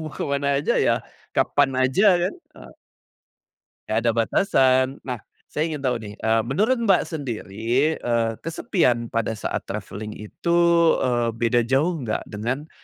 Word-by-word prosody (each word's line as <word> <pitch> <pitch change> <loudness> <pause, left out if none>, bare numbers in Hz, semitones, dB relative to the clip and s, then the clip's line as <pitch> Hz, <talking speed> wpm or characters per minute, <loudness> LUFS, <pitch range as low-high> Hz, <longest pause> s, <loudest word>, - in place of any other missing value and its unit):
mau 155 - -6
kemana 140 0 -1
aja 145 - 0
ya, - - +4 0.4
kapan 145 -1 +2
aja 130 +10 +2 0.2
kan 180 - 0 0.2
e - - -13 1.1
nggak 110 - +1
ada 120 - +4
batasan. 130 - +3 0.2
Nah 125 -3 -4 0.3
saya 155 +2 -1
ingin 155 -4 -5
tahu 125 -2 +1
nih, 105 -2 -9
eee, 110 +1 +1
menurut 215 - +1
Mbak 200 -6 +3
sendiri, 125 - -1
eee, 115 -1 0
kesepian 155 - 0
pada 115 -1 -1
saat 110 - -4
travelling 105 +1 -6
itu, 170 +11 -2 0.4
eee, 120 -2 0
beda 115 0 +1
jauh 150 +7 +1
nggak 115 -6 -3
dengan 125 +9 -4
125 Hz, 145 wpm, -23 LUFS, 115-150 Hz, 1.1 s, ya